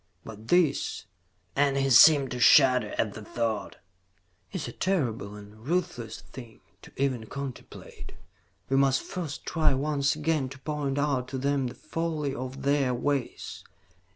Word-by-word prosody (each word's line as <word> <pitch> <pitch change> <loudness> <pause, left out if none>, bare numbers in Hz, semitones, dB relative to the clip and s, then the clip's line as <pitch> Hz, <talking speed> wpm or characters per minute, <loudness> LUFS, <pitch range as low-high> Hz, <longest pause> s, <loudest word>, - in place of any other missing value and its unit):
"But 110 0 -11
this," 165 - +1 0.5
and 140 -1 +2
he 135 0 +1
seemed 135 +1 +7
to 125 - -4
shudder 125 -3 +5
at 105 -2 0
the 110 - -9
thought, 110 -1 -3 0.8
"is 175 -6 -4
a - - -6
terrible 120 - -1
and 105 0 -12
a - - -18
ruthless 125 -4 -3
thing 120 -4 -12 0.2
to - - -14
even 130 -5 -1
contemplate. 140 -1 -8 0.5
We 135 - +1
must 135 -1 +3
first 165 -6 -6
try 155 -5 +2
once 140 0 0
again 155 -3 0
to 135 - -10
point 145 -2 -2
out 140 -3 0
to 135 - -5
them 140 0 0
the 120 - -8
folly 160 -4 -3
of 130 0 -6
their 140 -2 +2
ways. 140 0 -3
135 Hz, 155 wpm, -27 LUFS, 120-145 Hz, 0.8 s, seemed